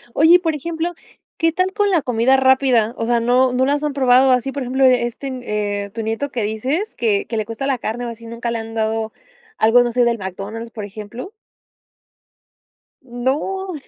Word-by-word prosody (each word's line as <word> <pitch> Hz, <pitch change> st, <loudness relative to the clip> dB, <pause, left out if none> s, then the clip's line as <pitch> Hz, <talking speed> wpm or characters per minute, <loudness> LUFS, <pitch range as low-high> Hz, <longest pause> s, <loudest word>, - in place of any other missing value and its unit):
Oye, 320 Hz, +4 st, +6 dB
y -, -, +6 dB
por 325 Hz, -3 st, -1 dB
ejemplo, 335 Hz, +3 st, -3 dB, 0.4 s
¿qué 330 Hz, -1 st, +2 dB
tal 370 Hz, +3 st, 0 dB
con 410 Hz, 0 st, +1 dB
la 345 Hz, -4 st, +3 dB
comida 250 Hz, +1 st, +2 dB
rápida? 260 Hz, -4 st, +3 dB
O 230 Hz, -, -2 dB
sea 240 Hz, 0 st, +2 dB
¿No 250 Hz, +2 st, +3 dB
no 255 Hz, +1 st, +2 dB
las 290 Hz, +2 st, 0 dB
han 300 Hz, -1 st, -1 dB
probado 260 Hz, -1 st, +4 dB
así, 255 Hz, +1 st, +1 dB
por 280 Hz, -1 st, -4 dB
ejemplo, 260 Hz, +2 st, 0 dB
este, 250 Hz, +1 st, +1 dB, 0.6 s
eh, -, -, -11 dB
tu 225 Hz, -, -5 dB
nieto 225 Hz, +6 st, -3 dB
que 240 Hz, -, -2 dB
dices, 260 Hz, -, -2 dB
que 210 Hz, -4 st, 0 dB
que 225 Hz, -, -3 dB
le 215 Hz, -, -1 dB
cuesta 230 Hz, +5 st, -4 dB
la 270 Hz, -2 st, +1 dB
carne 240 Hz, +2 st, -4 dB
o 235 Hz, -, -4 dB
así, 230 Hz, 0 st, -10 dB
nunca 235 Hz, +1 st, -5 dB
le 235 Hz, -, -2 dB
han 225 Hz, 0 st, -8 dB
dado 220 Hz, 0 st, -1 dB, 0.4 s
algo, 225 Hz, +3 st, +5 dB
no 240 Hz, -, -1 dB
sé, 245 Hz, +1 st, +2 dB
del 235 Hz, -1 st, +1 dB
McDonald's, 200 Hz, +4 st, -6 dB
por 215 Hz, -4 st, -6 dB
ejemplo? 215 Hz, -, -8 dB, 1.7 s
¡No! 285 Hz, +10 st, -2 dB
245 Hz, 200 wpm, -19 LUFS, 225-280 Hz, 1.7 s, Oye